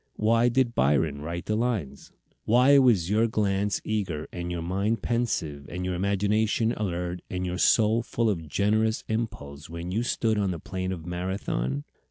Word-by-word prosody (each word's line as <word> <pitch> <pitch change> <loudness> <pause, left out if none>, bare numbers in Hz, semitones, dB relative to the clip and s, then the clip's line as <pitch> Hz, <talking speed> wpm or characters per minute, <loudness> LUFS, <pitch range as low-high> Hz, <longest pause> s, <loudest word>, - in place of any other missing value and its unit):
Why 115 +3 +3
did 120 -1 +1
Byron 70 - +1
write 85 +3 -5
the 105 - 0
lines? 105 - -2 0.3
Why 125 +5 +6
was 105 -9 +3
your 110 +2 +3
glance 100 -2 0
eager 95 -8 -2
and 90 0 -4
your 85 -1 -3
mind 100 +5 -1
pensive 80 -12 -1
and 90 +1 -4
your 90 - -1
imagination 105 +4 +1
alert 90 -3 -3
and 90 0 -3
your 90 0 -3
soul 110 +1 +4
full 115 0 -1
of 85 -7 -1
generous 110 +4 +1
impulse 75 -11 -4
when 85 +2 -6
you 110 +5 0
stood 115 -3 0
on 100 -2 +1
the 90 - -2
plain 95 +3 -4
of 85 -3 -6
Marathon? 90 -7 -2
100 Hz, 170 wpm, -27 LUFS, 85-110 Hz, 0.3 s, Why